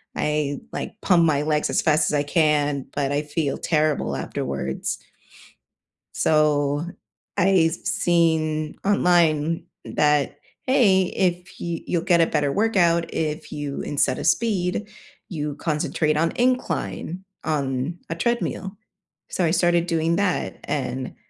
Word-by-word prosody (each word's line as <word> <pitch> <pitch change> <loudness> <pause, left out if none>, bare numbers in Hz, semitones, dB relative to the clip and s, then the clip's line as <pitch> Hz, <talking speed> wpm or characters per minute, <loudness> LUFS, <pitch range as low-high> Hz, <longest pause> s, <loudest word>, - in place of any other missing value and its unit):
I 150 -2 -1
like 210 - -5
pump 175 -3 +4
my 150 -3 +2
legs 150 0 0
as - - +1
fast 155 -1 +3
as - - -4
I 145 - +2
can, 145 -3 +1
but 140 -1 0
I 145 +1 +1
feel 150 -1 -2
terrible 155 -2 0
afterwards. 65 0 -3 1.2
So 150 -1 +2 0.5
I've 175 -3 +4
seen 160 -3 +1
online 165 -5 +3 0.2
that, 150 -2 +1 0.3
"Hey, 205 -8 +4
if 180 -1 -2
you 170 -1 -3
you'll 170 - 0
get 170 -2 +4
a 165 - +4
better 145 -2 0
workout, 175 -4 +2
if 155 -1 -3
you- 145 -2 -4
instead 140 -3 0
of - - -1
speed- 205 -3 +1 0.4
you 150 -4 -3
concentrate 150 0 0
on 165 +2 +2
incline 190 - -1 0.2
on 140 +1 -1
a 165 - -2
treadmill. 205 -1 -2 0.5
So 185 - -1
I 160 - +2
started 175 0 +2
doing 165 -1 +1
that, 200 -2 -1
and 130 -2 -3
160 Hz, 130 wpm, -23 LUFS, 150-175 Hz, 1.2 s, pump